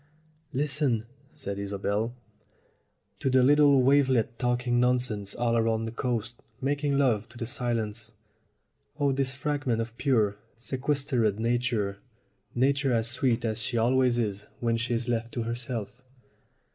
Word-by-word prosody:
"Listen," 135 -5 +1 0.3
said 100 -9 -4
Isobel, 100 +3 -2 1.0
"to 135 - 0
the 130 -1 +4
little 140 -1 +5
wavelets 130 -4 +3
talking 125 -1 +1
nonsense 125 -5 +1
all 115 -1 +1
round 115 0 0
the - - -4
coast 120 -1 -3 0.2
making 140 +1 0
love 120 -8 +1
to 120 - -14
the 120 - -3
silence. 115 -3 -2 0.9
Oh, 140 -1 +3
this 135 -1 0
fragment 140 -4 -1
of 115 0 -4
pure, 110 -7 +2 0.2
sequestered 125 -3 0
Na 115 +2 +2
ture 105 -5 -1 0.6
Nature 135 +2 +2
as 115 -1 +1
sweet 120 -1 +1
as 110 0 -1
she 120 +2 0
always 125 +1 +3
is 105 -3 -2
when 115 -1 +1
she 120 +1 -1
is 115 +1 -2
left 115 -1 -2
to 120 - -2
herself!" 120 0 -5
120 Hz, 140 wpm, -28 LUFS, 115-130 Hz, 1.0 s, little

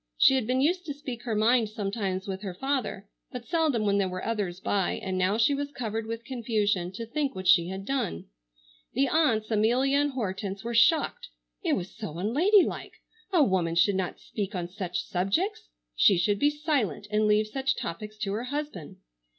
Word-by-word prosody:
She - - +6
had 260 -5 0
been 255 +1 +1
used 355 +6 +2
to 290 - -4
speak 260 -5 -7
her 225 -3 -1
mind 225 +1 +3
sometimes 200 -2 -3
with 190 -1 -4
her 190 -4 -5
father, 255 -5 -2 0.2
but 250 -2 -7
seldom 310 -10 +1
when 200 0 +2
there 190 -2 +1
were 185 0 -5
others 200 -6 -2
by, 190 -1 0
and 190 -1 -4
now 185 +3 +1
she 230 +5 +3
was 285 0 -3
covered 225 -4 -4
with 230 +1 -5
confusion 215 -7 0
to 230 +4 -5
think 280 +4 -2
what 185 0 -4
she 175 -3 +6
had 190 +1 -6
done. 260 - -2 0.7
The 275 +3 +2
aunts, 240 -8 +2
Amelia 245 +6 +3
and 290 -1 +1
Hortense, 200 -4 -3
were 235 +1 -3
shocked. 325 - +3 0.4
It 330 -4 +1
was 185 -7 -3
so 165 -7 -6
unladylike. 330 - +2 0.4
A 345 -6 +5
woman 180 -7 +1
should 175 +4 +4
not 190 -2 -2
speak 205 0 -5
on 175 -1 -2
such 180 -1 -4
subjects. 345 - -1 0.3
She 195 - +5
should 200 +3 +1
be 290 - +4
silent 295 - -1
and 215 0 +2
leave 210 +1 +3
such 270 +5 -1
topics 210 +5 -6
to 195 -1 -1
her 225 +4 -3
husband. 285 - -5
220 Hz, 190 wpm, -27 LUFS, 195-270 Hz, 0.7 s, She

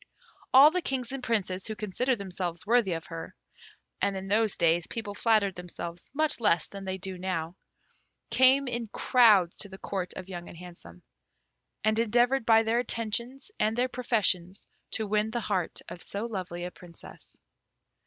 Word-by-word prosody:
All 275 +4 +9
the 365 +2 0
Kings 260 -5 -3
and 270 -1 -5
Princes 195 -6 -1
who 220 - -4
considered 235 +5 -1
themselves 180 -4 -4
worthy 225 -4 +3
of 165 -1 -5
her 165 -1 -8 0.7
(and 200 -1 +1
in 190 0 -6
those 215 0 +2
days 170 0 +2
people 220 -3 -5
flattered 210 -2 +2
themselves 175 -1 -7
much 310 0 +1
less 170 -8 +2
than 195 -1 -9
they 190 0 -3
do 190 -1 -7
now) 175 -2 -3 0.8
came 260 +3 +5
in 240 -2 -3
crowds 210 -6 +4
to 205 - -5
the 190 - -10
Court 190 -2 -4
of 185 - -7
Young 175 -2 -7
and - - -12
Handsome, 170 - -12 0.8
and 215 +1 +2
endeavoured 240 +2 +2
by 225 -1 +6
their 225 +2 +1
attentions 235 - -2
and 220 +2 +1
their 250 +1 +2
professions 200 -7 0 0.2
to 220 - -1
win 210 +1 +1
the 240 - -2
heart 190 -6 -2
of 180 - -8
so 205 +3 -4
lovely 185 -6 -5
a 180 - -5
Princess. 175 -2 -14
205 Hz, 170 wpm, -28 LUFS, 180-235 Hz, 0.8 s, All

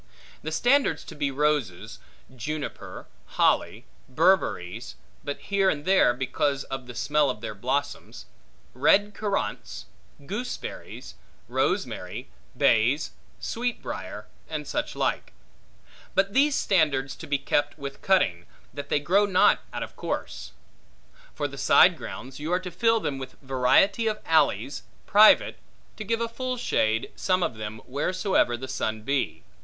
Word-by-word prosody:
The 155 - -5
standards 250 - +2
to - - -10
be 145 -1 -1
roses; 140 -9 -1 0.4
juniper; 150 +4 -6 0.3
holly; - - +2 0.2
berberries 155 - +1 0.3
(but 145 - -4
here 195 -1 +1
and 145 -2 -2
there, 190 -8 +5
because 135 +2 -1
of 135 -2 -6
the 125 - -9
smell 145 +2 +2
of 105 -5 -4
their 110 - -5
blossoms); 130 +7 -3 0.5
red 200 +11 +3
currants; 205 -2 -3 0.4
gooseberries; 225 - -6 0.3
rosemary; - - -2 0.3
bays; - - +3 0.3
sweetbriar; 245 +1 -4 0.2
and - - -4
such - - -3
like. - - -1 0.8
But 195 +1 +2
these 280 +3 +4
standards 145 - +1
to 160 - -9
be 145 -1 +1
kept 145 +2 0
with 140 -2 -7
cutting, 90 - +2 0.3
that 145 +1 -7
they - - +2
grow 195 +7 +3
not 185 -2 +4
out - - -4
of - - -10
course. 65 -1 -5 0.8
For - - -1
the - - -10
side - - +6
grounds, 130 +2 -8
you 155 +3 -4
are 180 - +2
to 180 -1 -7
fill 225 +2 +2
them 135 -6 -3
with 130 -1 -8
variety 135 - +3
of 215 -1 -1
alleys, 145 -3 +2 0.2
private, 215 +1 +6 0.4
to 215 - -6
give 230 +2 -1
a 230 - 0
full 255 +2 -4
shade, 110 - 0
some 185 -1 +1
of - - -1
them, 110 0 -6
wheresoever 150 - 0
the 130 +2 -7
sun 110 -4 -3
be. 135 +2 -1
150 Hz, 140 wpm, -26 LUFS, 130-195 Hz, 0.8 s, side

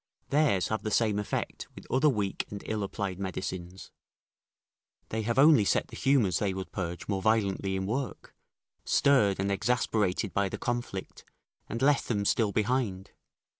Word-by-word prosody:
Theirs 140 -11 +2
have 110 - -1
the 110 - -3
same 105 -1 +2
effect 105 - -3
with - - -11
other 135 +4 +4
weak 105 -7 -2
and 100 - -7
ill 110 -1 -2
applied 100 -2 -3
medicines; 95 -1 -5 1.2
they 110 - -2
have 115 +3 -2
only 145 -4 +7
set - - +1
the - - -10
humours 125 - +2
they 100 -3 -1
would 95 -1 -6
purge 85 -2 -4
more 100 -2 -1
violently 100 -2 +1
in 95 0 -2
work, 125 +6 -4 0.5
stirred 110 -10 +3
and 100 +1 0
exasperated 105 -3 0
by 100 -1 +1
the - - -5
conflict, 120 -6 -4 0.5
and 115 +3 -3
left 145 0 +3
them 100 -4 -1
still 105 0 +2
behind. 105 -3 -1
105 Hz, 160 wpm, -29 LUFS, 95-120 Hz, 1.2 s, only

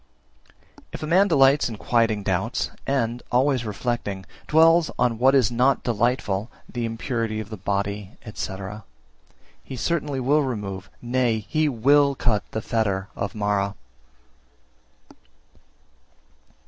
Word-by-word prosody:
350. - - -22
If - - -6
a - - -3
man 185 +5 +4
delights 140 -5 +4
in 115 - -6
quieting 115 -2 +1
doubts, - - -1 0.2
and, 120 -3 0
always 130 -1 +2
reflecting, 105 -3 -3 0.2
dwells 165 +1 +5
on 120 -2 +1
what 135 +2 +5
is 125 -4 +3
not 130 +3 +2
delightful 115 -3 0 0.2
(the 120 -2 -3
impurity 115 -1 -2
of 110 0 -7
the 110 - -5
body, 100 +1 -3 0.2
&c.), 95 - -4 1.1
he 130 - -8
certainly 145 0 -1
will 140 +4 +3
remove, 100 -7 -4
nay, 120 -3 0
he 155 -1 +1
will 140 +3 +3
cut 110 -5 +1
the 110 - -4
fetter 100 -3 -1
of 100 +1 -4
Mara. 100 -1 0
120 Hz, 125 wpm, -24 LUFS, 105-135 Hz, 1.1 s, dwells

